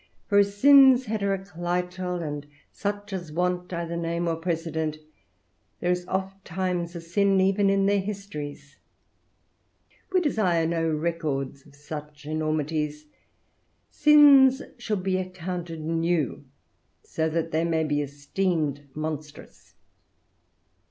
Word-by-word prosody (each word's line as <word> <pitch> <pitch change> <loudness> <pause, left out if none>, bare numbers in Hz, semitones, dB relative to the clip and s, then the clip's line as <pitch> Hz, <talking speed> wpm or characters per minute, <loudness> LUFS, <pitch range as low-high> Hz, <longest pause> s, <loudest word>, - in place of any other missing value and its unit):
For 205 -1 +5
of 200 - +5
sins 265 +4 +6
heteroclital, 180 -3 -2
and 145 -1 -5 0.2
such 205 0 -4
as 175 -4 -5
want 180 +2 -1
either 170 -1 -3
name 170 0 -2
or 165 - +1
precedent, 160 -2 -2 0.8
there 175 - 0
is 180 0 -2
ofttimes 185 -2 -3
a 170 - -5
sin 195 +3 +2
even 195 +1 +3
in 195 0 +2
their 200 0 +3
histories. 150 -8 -7 1.3
We 370 - +4
desire 195 - +1
no 165 0 0
records 150 -4 -2
of 145 - -19
such 150 0 -9
enormities; 155 -1 -2 0.9
sins 285 -3 +6 0.2
should 210 -6 -2
be 185 -1 +1
accounted 180 -3 -5
new, 165 -2 -1 0.6
that - - -28
so 160 - -1
they 160 0 -1
may 165 -1 +1
be 145 -1 0
esteemed 145 0 -2
monstrous. 155 -1 -7
170 Hz, 115 wpm, -26 LUFS, 155-195 Hz, 1.3 s, sins